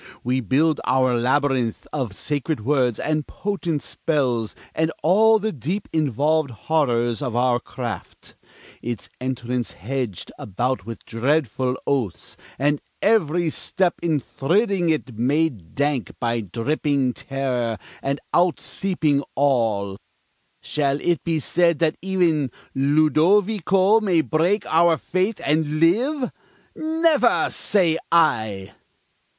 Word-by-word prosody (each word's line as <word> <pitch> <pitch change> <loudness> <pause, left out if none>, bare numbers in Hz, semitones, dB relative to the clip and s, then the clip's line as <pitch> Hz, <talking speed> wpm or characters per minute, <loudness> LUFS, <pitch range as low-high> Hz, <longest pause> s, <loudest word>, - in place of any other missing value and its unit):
We 125 +2 +1
build 145 +7 +1
our 130 -1 +2
labyrinth 130 -1 0
Of 125 -9 -3
sacred 145 -3 -2
words 130 -5 +1
and 155 -1 -1
potent 180 -7 -3
spells, 125 -8 -1 0.2
and 160 0 0
all 220 +6 +5
The 220 +1 -2
deep 170 - -4
involved 150 +1 +1
horrors 120 -1 0
of 125 -5 -3
our 120 0 +2
craft 120 -6 -7 0.5
Its 120 -2 -5
entrance 125 -2 -3
hedg'd 125 -3 -4
about 110 +1 -2
with 115 - -8
dreadful 130 0 0
oaths, 125 -10 -2 0.2
And 145 +2 +1 0.2
every 175 -6 +2
step 185 +2 0
in 165 -3 +1
thridding 180 - 0
it 130 -8 -2
made 130 - 0
dank 140 -3 -1
By 120 -1 0
dripping 130 - -1
terror 125 -5 -2 0.2
and 140 +1 -2
out 175 -1 +3
seeping 160 -7 0
awe, 110 -8 +1 0.7
Shall 140 -1 0
it 175 0 0
be 165 -2 0
said 170 +2 +2
that 160 0 +1
e'en 170 -7 +1 0.2
Ludovico 185 +8 +3
May 185 -7 +2
break 170 +7 +1
our 165 0 +3
faith 185 +7 -1
and 155 0 +1
live? 250 - +2 0.4
Never, 320 0 +2
say 170 -6 +2
I! 110 - +2
145 Hz, 115 wpm, -22 LUFS, 125-170 Hz, 0.7 s, all